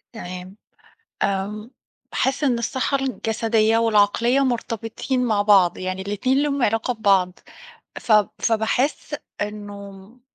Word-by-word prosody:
تمام، 185 -1 -8 0.7
آمم 205 +4 -2 0.4
باحس 270 +3 0
إن 250 -4 +2
الصحّة 260 +4 -1
الجسدية 225 -3 +1
والعقلية 230 +3 +3
مرتبطين 240 +1 -2
مع 210 -3 +2
بعض, 195 -4 +4
يعني 185 +1 -4
الاتنين 225 +7 0
ليهم 280 -2 -1
علاقة 225 +2 +1
ببعض 195 -4 +2 0.6
فب 210 -3 +3
فباحس 230 +7 0 0.3
إنه 205 -1 -6
م 195 +6 -16
220 Hz, 110 wpm, -22 LUFS, 200-245 Hz, 0.7 s, بعض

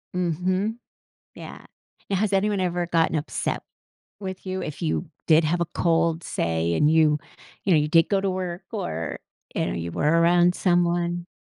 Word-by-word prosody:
Mhm. 185 +5 0 0.6
Yeah. - - -10 0.5
Now, 195 - +2
has 205 +1 0
anyone 200 0 +1
ever 175 -1 -1
gotten 165 -1 +1
upset 150 +1 -2 0.6
with 190 -1 -6
you 185 0 -3
if 150 +3 -6
you 165 +2 -1 0.2
did 160 0 +5
have 170 +3 0
a - - +3
cold, 165 -1 +1
say, 85 0 -1
and 150 - +3
you 155 -2 +4 0.5
you 195 - +2
know, 155 - +6
you 150 - 0
did 165 +1 +4
go 195 -2 +2
to 195 -1 0
work 185 0 -4
or, 80 0 -4 0.4
you - - 0
know, - - -2
you 85 0 -4
were 165 +3 +2
around 175 +1 +4
someone? 175 -1 +1
175 Hz, 175 wpm, -24 LUFS, 155-185 Hz, 0.6 s, know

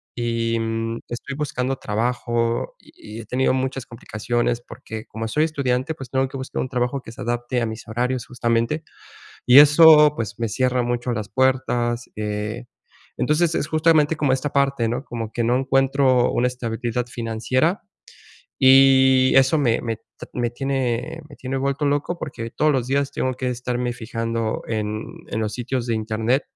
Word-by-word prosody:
y, 115 -1 -1
mm, 115 0 -2
estoy 125 +3 -6
buscando 135 -3 -2
trabajo 115 +1 -1
y 110 +2 -11
he - - -12
tenido 130 +4 +1
muchas 130 -1 -2
complicaciones 120 +1 -2
porque, 110 -2 -9
como 115 +1 -5
soy 150 +8 +1
estudiante, 140 -1 -1
pues 135 -3 -9
tengo 130 0 +1
que 135 - -8
buscar 130 - -4
un 130 - -3
trabajo 125 +1 -1
que 115 - -11
se - - -10
adapte 120 +1 -2
a - - +1
mis 110 +1 -7
horarios 125 +2 -2
justamente, 120 +5 -1 0.6
y 125 +3 +9
eso, 150 0 +8
pues, 110 -1 -5
me 115 -2 -1
cierra 125 +2 +1
mucho 120 +1 -2
las 110 -3 -4
puertas, 125 -1 0
eh, 105 +3 -4 0.5
entonces 155 +4 +2
es 145 - -1
justamente 155 -1 +3
como 140 -4 +2
esta 135 +2 -1
parte, 140 -4 +1
¿no? 125 +3 -3
Como 115 -2 -5
que 120 - -1
no 120 +2 +2
encuentro 135 -1 +2
una 125 - +1
estabilidad 120 -1 -3
financiera, 120 - -1 0.8
y 130 -1 +6
eso 135 +4 +5
me 120 -5 +2
me 115 -2 -3 0.4
me 120 -1 -1
tiene 135 +3 -2
me 145 - -13
tiene 135 +1 -4
vuelto 140 +2 -1
loco 145 +5 -1
porque 115 -5 -6
todos 150 +5 +2
los 130 -3 -1
días 140 +1 0
tengo 130 -1 -1
que 125 0 -2
estarme 125 0 -2
fijando 115 -1 -3
en 110 -1 -2 0.3
en - - -3
los 105 -1 -2
sitios 125 0 -3
de 115 - 0
internet, 110 +4 0
125 Hz, 165 wpm, -22 LUFS, 115-135 Hz, 0.8 s, y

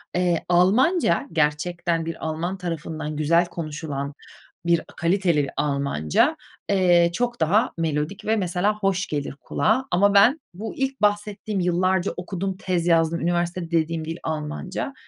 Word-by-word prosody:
Eee, 175 -2 +1
Almanca 200 - +3
gerçekten 165 +2 0
bir 165 -1 -5
Alman 165 +4 -2
tarafından 160 -3 -4
güzel 165 +3 +3
konuşulan 150 -4 -5 0.5
bir 170 -1 +3
a - - -10
kaliteli 170 -5 +1
Almanca, 140 - +1 0.3
eee, 175 -3 +4
çok 240 +4 -1
daha 195 +8 +3
melodik 160 +3 -2
ve 220 - +2
mesela 195 +1 0
hoş 195 -1 0
gelir 145 -2 -3
kulağa. 250 +5 +1
Ama 200 +3 +4
ben 230 +10 +6
bu 210 +5 -6
ilk 270 -2 -2
bahsettiğim 210 0 0
yıllarca 185 +1 +1
okudum, 185 +1 -4
tez 180 -3 -1
yazdım, 165 -1 +3
"Üniversitede..." 175 0 -1
dediğim 165 -1 0
dil, 165 +1 -5
Almanca, 160 - -4
175 Hz, 135 wpm, -23 LUFS, 160-195 Hz, 0.5 s, ben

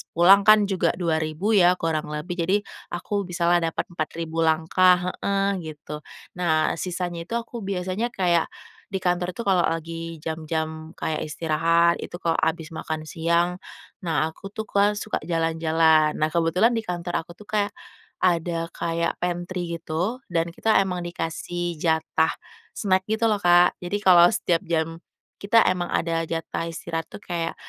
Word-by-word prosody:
pulang 195 +4 +6
kan 215 -1 +8
juga 195 -3 0
2000 160 +3 -1
ya 180 -4 +5
kurang 160 -3 -2
lebih 150 +4 -5
jadi 185 +4 +2 0.3
aku 200 +3 -3
bisalah 175 -1 +2
dapat 165 -1 -1
4000 165 0 -4
langkah 175 +3 +3
heeh 200 0 0 0.2
gitu, 150 0 -8 0.4
nah 160 -3 +2
sisanya 175 -2 -4
itu 230 - -3
aku 235 0 -4
biasanya 195 +2 -2
kayak 175 -3 +2 0.4
di 190 -2 -4
kantor 180 0 0
tuh, 235 - -4
kalau 185 -4 +3
lagi 165 -1 -5
jam-jam 160 0 -4
kayak 155 -1 -2
istirahat 165 +2 +2
itu - - -7
kalau 170 -2 0
habis 160 0 -1
makan 160 -1 -4
siang 170 +3 0 0.4
nah 160 -2 0
aku 195 - -10
tuh, 220 - -2
Kak, 205 0 +2
suka 215 +1 -2
jalan-jalan. 160 -2 +3
Nah 155 0 0
kebetulan 170 +7 +3
di 230 - 0
kantor 175 -4 -3
aku 170 - -12
tuh 210 - -15
kayak 205 0 -2 0.5
ada 170 -1 +1
kayak 170 0 -2
pantry 175 0 -3
gitu 175 +11 -3
dan 165 -1 +1
kita 220 -1 +3
emang 180 -2 -1
dikasih 175 0 -4
jatah 160 0 +1 0.4
snack 190 -2 +1
gitu 220 +1 +1
loh 210 -2 +1
Kak, 175 0 +5
jadi 180 +4 -1
kalau 175 -3 +7
setiap 170 -2 0
jam 165 0 -2 0.4
kita 220 +3 +4
emang 180 -1 -2
ada 165 -1 -1
jatah 165 0 -3
istirahat 165 0 -4
tuh - - -11
kayak 170 -2 -3
170 Hz, 155 wpm, -24 LUFS, 165-185 Hz, 0.5 s, kan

